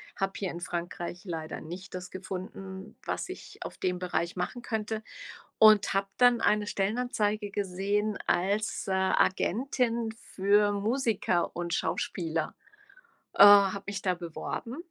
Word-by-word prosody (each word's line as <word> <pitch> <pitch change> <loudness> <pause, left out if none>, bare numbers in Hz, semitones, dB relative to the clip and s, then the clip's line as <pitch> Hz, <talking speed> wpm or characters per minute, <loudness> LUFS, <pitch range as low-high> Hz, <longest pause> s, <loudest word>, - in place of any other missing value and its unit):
habe 195 -1 -1
hier 190 -3 -2
in 175 - -7
Frankreich 175 0 -5
leider 160 -3 -5
nicht 180 +4 -9
das 180 0 -6
gefunden, 190 +1 -7
was - - -3
ich - - -9
auf - - -8
dem 180 -1 -1
Bereich 175 -1 -2
machen 185 +7 -3
könnte 220 -1 -3 0.6
und 215 -3 +6
habe 195 0 +1
dann 245 -2 +5
eine 210 0 +2
Stellenanzeige 210 0 -1
gesehen 200 +2 -1
als, 200 +3 0
äh, 190 - +1
Agentin 230 +5 +1 0.2
für 205 +2 +4
Musiker 210 -4 0
und 175 0 -2
Schauspieler. 165 -3 -2 0.8
Äh, - - +8
habe 200 -1 +7
mich 200 -1 -3
da 185 -2 +1
beworben 175 - -5
195 Hz, 135 wpm, -29 LUFS, 180-215 Hz, 0.8 s, Äh